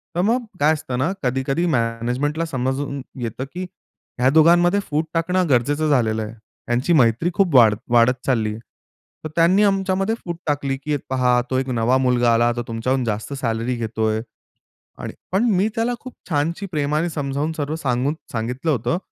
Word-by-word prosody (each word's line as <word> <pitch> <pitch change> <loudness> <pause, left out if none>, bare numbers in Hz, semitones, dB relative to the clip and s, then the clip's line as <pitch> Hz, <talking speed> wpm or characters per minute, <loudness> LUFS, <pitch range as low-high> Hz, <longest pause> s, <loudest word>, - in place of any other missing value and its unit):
तर 175 - +1
मग 235 +5 +1
काय 150 +2 +4
असतं 140 -5 -4
ना 145 +8 +1
कधी 130 +1 0
कधी 165 +6 +1
मॅनेजमेंटला 125 +3 -1
समजून 135 -1 -2 0.2
येतं 120 +2 -4
की 180 +1 -4 0.6
ह्या 125 +1 +4
दोघांमध्ये 175 +5 +5
फूट 155 +1 0
टाकणं 180 +2 +1
गरजेचं 145 +5 +2
झालेलं 110 -6 +2
आहे. 105 +1 -7 0.4
यांची 125 +8 +1
मैत्री 125 +2 +3
खूप 175 -5 +1
वाढ 115 -4 +7 0.2
वाढत 120 +1 +5
चालली. 110 -5 0 0.7
तर - - -3
त्यांनी 175 +5 +4
आमच्यामध्ये 195 +1 +1
फूट 170 -2 -4
टाकली, 140 -2 -1
की 145 +2 -2
पहा 125 -2 +2
तो 130 - +1
एक 135 0 -3
नवा 120 +1 +2
मुलगा 125 -2 +3
आला 120 +1 +3
तो 120 - -1
तुमच्याहून 125 +3 -1
जास्त 110 +4 -3
सॅलरी 120 -2 -2
घेतोय 110 -1 -1 0.8
आणि - - -6 0.2
पण 190 +4 +2
मी 190 +3 +2
त्याला 230 +2 0
खूप 255 +1 -10 0.2
छानशी 165 +5 -1
प्रेमाने 150 +2 0
समजावून 145 0 -2 0.3
सांगून 130 -1 0 0.2
सांगितलं 125 +7 -2
होतं, 125 +4 0
135 Hz, 165 wpm, -21 LUFS, 120-165 Hz, 0.8 s, वाढ